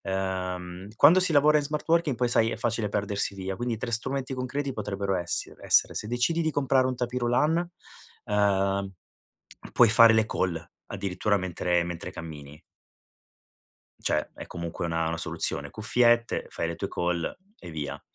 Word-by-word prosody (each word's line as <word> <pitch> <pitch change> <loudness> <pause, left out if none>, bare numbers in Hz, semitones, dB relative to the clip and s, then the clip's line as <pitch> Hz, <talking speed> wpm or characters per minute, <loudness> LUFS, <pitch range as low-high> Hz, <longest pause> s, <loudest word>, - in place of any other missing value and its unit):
Ehm, 95 -1 -3
quando 155 +9 +7
si 185 -2 +3
lavora 150 0 +5
in 150 - 0
smart 150 +1 -4
working 165 -4 +2
poi 125 +1 +1
sai 115 -1 +3
è - - -4
facile 115 -2 -1
perdersi 100 0 -2
via, 95 0 -4
quindi 120 +2 -3
3 120 +2 -4
strumenti 135 +4 -2
concreti 135 +2 -3
potrebbero 100 -4 -2
essiere 85 -2 -3
essere: - - +4
se 105 - -3
decidi 125 +8 0
di 160 - +1
comprare 135 -2 +2
un 130 - -2
tapis 125 0 -3
roulant, 150 +8 +1 0.6
uhm, 100 -1 +1 0.8
puoi 120 - +6
fare 115 0 +7
le 110 0 +4
call 85 -6 -2 0.2
addirittura 100 +1 -1
mentre 90 -2 0
mentre 85 -1 -6
cammini. 75 -3 -10 1.4
Cioè 75 - -1
è - - -9
comunque 85 -1 -5
una 80 -1 -1
una 85 0 -2
soluzione, 70 -2 -2
cuffiette, 120 +3 +2
fai 85 - -3
le 85 - -4
tue - - -4
call 85 -1 -2 0.2
e - - -10
via. 75 -3 -5
105 Hz, 160 wpm, -27 LUFS, 90-125 Hz, 1.4 s, quando